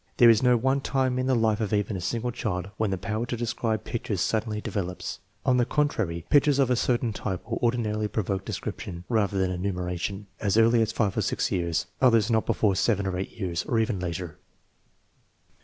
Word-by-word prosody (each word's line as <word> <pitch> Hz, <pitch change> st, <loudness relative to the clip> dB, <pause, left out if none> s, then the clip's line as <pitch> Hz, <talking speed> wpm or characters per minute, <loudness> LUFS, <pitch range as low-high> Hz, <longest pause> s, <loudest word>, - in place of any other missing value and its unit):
There 120 Hz, -1 st, +8 dB
is 110 Hz, -, +3 dB
no 125 Hz, -1 st, +4 dB
one 135 Hz, +4 st, +1 dB
time 130 Hz, -2 st, 0 dB
in 130 Hz, -, 0 dB
the 130 Hz, -, +3 dB
life 110 Hz, -2 st, +2 dB
of 105 Hz, -, -1 dB
even 105 Hz, -1 st, 0 dB
a 90 Hz, -, -4 dB
single 115 Hz, +6 st, -2 dB
child 100 Hz, -5 st, -3 dB
when 110 Hz, -2 st, +1 dB
the 95 Hz, -, -1 dB
power 110 Hz, +4 st, -3 dB
to 120 Hz, -, -3 dB
describe 115 Hz, -2 st, -1 dB
pictures 110 Hz, -5 st, -3 dB
suddenly 110 Hz, +2 st, 0 dB
de -, -, -5 dB
velops. 90 Hz, -3 st, -4 dB, 0.3 s
On 125 Hz, -, +4 dB
the 125 Hz, -, +4 dB
contrary, 110 Hz, -, -1 dB
pictures 145 Hz, -1 st, +5 dB
of 135 Hz, -3 st, +3 dB
a -, -, +4 dB
certain 120 Hz, -1 st, 0 dB
type 95 Hz, -3 st, -4 dB
will -, -, -3 dB
ordinarily 110 Hz, -3 st, 0 dB
provoke 100 Hz, -2 st, -2 dB
description, 85 Hz, -2 st, -5 dB
rather 105 Hz, -4 st, +1 dB
than 95 Hz, -1 st, +1 dB
enumeration, 90 Hz, +1 st, -3 dB
as 105 Hz, 0 st, +1 dB
early 115 Hz, +1 st, +5 dB
as 110 Hz, -, +1 dB
5 105 Hz, -4 st, 0 dB
or -, -, +3 dB
6 -, -, -1 dB
years; 85 Hz, -2 st, 0 dB, 0.2 s
others 115 Hz, -3 st, +4 dB
not 110 Hz, -1 st, +2 dB
before 100 Hz, -3 st, +2 dB
7 100 Hz, 0 st, +1 dB
or 95 Hz, -1 st, -1 dB
8 95 Hz, +1 st, -3 dB
years, 90 Hz, -5 st, -3 dB
or 115 Hz, -, 0 dB
even 110 Hz, -3 st, +1 dB
later. 90 Hz, -2 st, -5 dB
110 Hz, 205 wpm, -26 LUFS, 95-120 Hz, 0.3 s, There